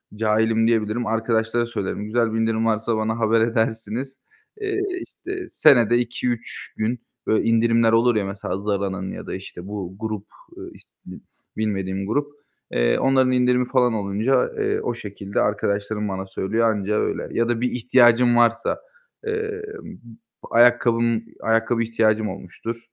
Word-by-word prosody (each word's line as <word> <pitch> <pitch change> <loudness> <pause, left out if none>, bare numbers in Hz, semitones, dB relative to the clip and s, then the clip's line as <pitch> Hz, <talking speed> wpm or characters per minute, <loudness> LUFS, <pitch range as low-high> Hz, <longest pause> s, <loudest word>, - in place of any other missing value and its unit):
cahilim 110 +1 +2
diyebilirim. 110 0 0
Arkadaşlara 115 +1 0
söylerim. 105 -2 -4
Güzel 115 0 0
bir 115 - 0
indirim 115 0 +1
varsa 110 0 0
bana 110 +1 -1
haber 110 0 +3
edersiniz. 115 +2 -1 0.4
Eee, 400 -1 -1 0.3
işte 370 -1 -7
senede 120 -6 +5
2-3 120 0 -3
gün 115 +2 -1 0.3
böyle 110 - +2
indirimler 115 0 +3
olur 115 +1 +4
ya 100 -2 +1
mesela 95 -1 -4
Zara'nın 100 -2 -2
ya - - -8
da - - -4
işte 95 -1 -9
bu 95 -3 -6
grup, 110 -3 -4 0.3
ııı, - - -9
işte, - - -20 0.7
bilmediğim 95 -2 -2
grup, 145 +6 0 0.4
eee, - - +2
onların 130 -1 +3
indirimi 125 0 +2
falan 125 -3 +3
olunca, 110 +5 +1
eee, - - 0
o 120 - -2
şekilde 100 -2 -4
arkadaşlarım 105 0 -1
bana 95 0 -4
söylüyor. 110 +5 0
Anca 105 0 -1
öyle. - - -2
Ya 115 0 +1
da 120 0 0
bir 125 - 0
ihtiyacım 120 0 +4
varsa, 115 -1 +2 0.5
eee, 440 0 -2 0.8
b - - -9
ayakkabım 115 -1 +4 0.2
ayakkabı 115 +1 +1
ihtiyacım 110 -2 +1
olmuştur 95 +5 -7
115 Hz, 145 wpm, -22 LUFS, 105-120 Hz, 0.8 s, senede